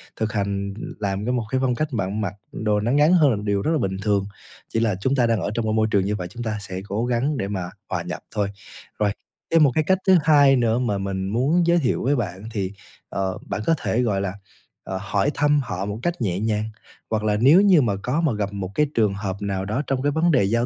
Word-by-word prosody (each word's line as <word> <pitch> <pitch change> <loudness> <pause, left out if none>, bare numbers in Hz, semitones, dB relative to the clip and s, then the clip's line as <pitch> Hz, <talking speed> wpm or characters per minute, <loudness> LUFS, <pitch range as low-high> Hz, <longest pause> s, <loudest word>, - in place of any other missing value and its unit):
thực 110 0 -2
hành 100 -1 -2 0.3
làm 100 0 -2
cái 125 - 0
một 125 -2 0
cái 130 - 0
phong 125 -2 +1
cách 155 +5 -1
bạn 100 -2 -2
mặc 100 -2 -2 0.2
đồ 105 -1 0
nó 110 +3 0
ngắn 150 +5 +4
hơn 160 -6 +5
là 120 - +2
một 105 - -5
điều 100 -1 +1
rất 155 - 0
là 165 - +2
bình 95 -7 -1
thường. 100 -1 +1 0.4
Chỉ 115 - -1
là 110 -4 +1
chúng 130 +5 +1
ta 125 -3 +3
đang 115 -4 +1
ở 95 - -2
trong 115 0 -1
cái 110 - 0
môi 110 0 +2
trường 100 -2 +2
như 105 +1 0
vậy, 90 -3 -4
chúng 120 +7 -7
ta 110 -2 -2
sẽ 95 -1 -5
cố 105 +4 -1
gắng 125 +4 0
để 100 - -2
mà 95 -3 -3 0.2
hòa - - -1
nhập - - -5 0.2
thôi. 100 -2 0 0.5
Rồi, 105 -1 +2 0.4
thêm 165 -1 +6
một 140 - +5
cái 155 - +3
cách 190 +5 +3
thứ 190 -1 +7
2 145 -3 +6
nữa 120 -2 +2
mà 115 -5 0
mình 95 -1 -3
muốn 145 - +2
giới 170 0 +4
thiệu 135 -7 0
với 140 +4 +2
bạn 100 -6 -3
thì, 100 -4 -2 0.4
ờ, 95 -1 -2
bạn - - -3
có 165 - +4
thể, 120 -3 0
gọi 105 -5 0
là, 100 -2 -2 0.5
ờ, 95 - -4
hỏi 120 +7 0
thăm 145 0 +3
họ 100 -6 -4
một 105 +2 -4
cách 175 -4 -2
nhẹ 95 -5 0
nhàng, 105 0 0 0.5
hoặc 110 -1 -1
là 105 -1 +1
nếu 150 +10 +7
như 190 -6 +6
mà 115 -6 +1
có 135 +7 0
mà 155 -7 +1
gặp 100 -1 -3
một 95 -2 -4
cái 150 - +3
trường 105 -3 +2
hợp 100 -1 -3
nào 100 -1 -2
đó 110 +7 -1
trong 135 -1 0
cái 145 +1 +1
vấn 160 +3 +2
đề 130 -9 +4
giao 115 +5 +1
110 Hz, 265 wpm, -23 LUFS, 100-135 Hz, 0.5 s, thứ